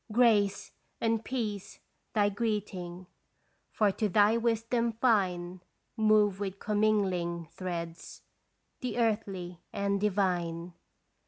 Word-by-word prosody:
" -, -, -15 dB
Grace 215 Hz, -4 st, +3 dB, 0.3 s
and 225 Hz, -1 st, +1 dB
peace 215 Hz, -7 st, -4 dB, 0.2 s
" -, -, -46 dB
thy 205 Hz, -1 st, +4 dB
greeting, 195 Hz, -4 st, -3 dB, 0.6 s
For 210 Hz, -2 st, +2 dB
to 210 Hz, +2 st, -1 dB
thy 205 Hz, +3 st, +5 dB
wisdom 230 Hz, 0 st, +1 dB
fine 185 Hz, -7 st, +1 dB, 0.3 s
Move 215 Hz, -3 st, +3 dB
with 195 Hz, -1 st, -3 dB
commingling 190 Hz, -6 st, 0 dB
threads 170 Hz, -2 st, -6 dB, 0.6 s
The 245 Hz, -3 st, -3 dB
earthly 195 Hz, -6 st, -1 dB
and 200 Hz, 0 st, -1 dB
divine. 180 Hz, -4 st, 0 dB
205 Hz, 105 wpm, -30 LUFS, 180-220 Hz, 0.6 s, thy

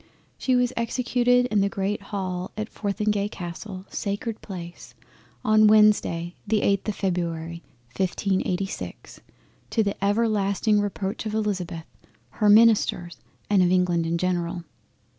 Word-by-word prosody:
She 255 Hz, -, 0 dB
was 250 Hz, 0 st, +2 dB
executed 245 Hz, +1 st, +2 dB
in 210 Hz, -2 st, +3 dB
the 200 Hz, -, +2 dB
Great 200 Hz, +1 st, -2 dB
Hall 185 Hz, -3 st, -4 dB
at 215 Hz, 0 st, -3 dB
Fortheringay 205 Hz, 0 st, -1 dB
Castle 185 Hz, +1 st, -7 dB
(sacred 205 Hz, +2 st, -3 dB
Place!) 175 Hz, -3 st, -9 dB, 0.5 s
on 215 Hz, 0 st, +5 dB
Wednesday 210 Hz, -5 st, +4 dB
the 210 Hz, 0 st, +2 dB
8th 200 Hz, +1 st, +1 dB
of 210 Hz, -, -1 dB
February 170 Hz, -3 st, -3 dB, 0.3 s
1586—to 195 Hz, +3 st, -3 dB
the 200 Hz, -1 st, -3 dB
everlasting 205 Hz, 0 st, +2 dB
Reproach 205 Hz, +1 st, -3 dB
of 215 Hz, -, -3 dB
Elizabeth, 185 Hz, -6 st, -2 dB, 0.5 s
her 210 Hz, -, +1 dB
Ministers, 205 Hz, -6 st, +4 dB, 0.3 s
and 200 Hz, -2 st, +3 dB
of 180 Hz, -, +4 dB
England 175 Hz, -2 st, +2 dB
in 170 Hz, +1 st, 0 dB
general. 175 Hz, -1 st, -1 dB
200 Hz, 120 wpm, -25 LUFS, 180-215 Hz, 0.5 s, on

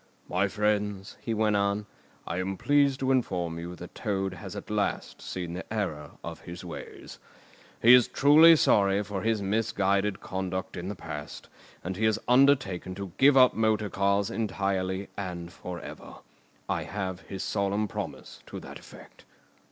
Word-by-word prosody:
"My 95 Hz, +3 st, +1 dB
friends," 105 Hz, -1 st, -1 dB
he 115 Hz, -, -2 dB
went 105 Hz, -1 st, +2 dB
on, 100 Hz, +1 st, 0 dB, 0.4 s
"I 85 Hz, -, -3 dB
am 95 Hz, +1 st, -2 dB
pleased 140 Hz, +1 st, +3 dB
to 135 Hz, 0 st, +2 dB
inform 90 Hz, -10 st, 0 dB
you 85 Hz, +1 st, -6 dB
that -, -, -10 dB
Toad 95 Hz, -2 st, -2 dB
has 85 Hz, -, -8 dB
at -, -, -7 dB
last -, -, -2 dB
seen 90 Hz, -2 st, -5 dB
the 90 Hz, +4 st, -7 dB
error 80 Hz, -10 st, -3 dB
of 85 Hz, -1 st, -6 dB
his 85 Hz, 0 st, -9 dB
ways. -, -, -9 dB, 0.6 s
He 120 Hz, +2 st, +9 dB
is 125 Hz, -1 st, +7 dB
truly 155 Hz, +4 st, +7 dB
sorry 100 Hz, -7 st, +3 dB
for 100 Hz, -1 st, -4 dB
his 110 Hz, -2 st, 0 dB
misguided 100 Hz, -1 st, +1 dB
conduct 95 Hz, 0 st, -4 dB
in 90 Hz, +1 st, -5 dB
the 100 Hz, -, -4 dB
past, 75 Hz, -4 st, -8 dB, 0.3 s
and 90 Hz, +1 st, -3 dB
he 110 Hz, -, +1 dB
has 110 Hz, -1 st, +3 dB
undertaken 125 Hz, -9 st, +3 dB
to 100 Hz, -2 st, -6 dB
give 135 Hz, 0 st, +6 dB
up 130 Hz, -1 st, +7 dB
motor 110 Hz, -2 st, +1 dB
cars 100 Hz, 0 st, +1 dB
entirely 95 Hz, -3 st, -1 dB
and 90 Hz, -3 st, -5 dB
for 90 Hz, -1 st, -7 dB
ever. -, -, -10 dB, 0.5 s
I -, -, -1 dB
have 95 Hz, -3 st, -4 dB
his 95 Hz, -1 st, -6 dB
solemn 100 Hz, +1 st, 0 dB
promise -, -, -7 dB
to -, -, -7 dB
that -, -, -10 dB
effect." -, -, -15 dB
100 Hz, 165 wpm, -28 LUFS, 95-110 Hz, 0.6 s, He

